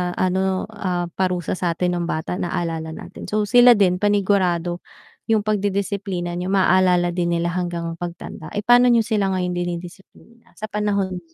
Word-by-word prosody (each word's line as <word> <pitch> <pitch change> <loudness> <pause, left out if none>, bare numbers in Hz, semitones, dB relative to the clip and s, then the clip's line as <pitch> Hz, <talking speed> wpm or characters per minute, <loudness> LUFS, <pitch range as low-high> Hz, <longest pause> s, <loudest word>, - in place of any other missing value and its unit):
ano, 190 +1 0
ah, 180 -5 -3
parusa 180 -1 -2
satin 175 0 0
nung 170 - -2
bata 160 +3 -3
naalala 165 -2 -3
natin, - - -10
so 210 0 0
sila 245 +3 +6
din 185 -3 +2
panigurado 190 -4 +1 0.5
yung 220 -2 +2
pagdidisiplina 200 -3 -2
niyo 180 - -3
maalala 185 -2 +3
din 175 0 -1
nila 170 +1 -1
hanggang 175 -1 -3 0.2
pagtanda. 175 -1 -7
Eh, 205 - -2
pano 245 +2 +6
niyo 235 -2 +4
sila 215 -3 0
ngayon 180 -1 -1
dinidisiplina 175 +6 -8
sa 215 0 -7
panahon? 200 -3 -1
185 Hz, 150 wpm, -21 LUFS, 175-205 Hz, 0.5 s, sila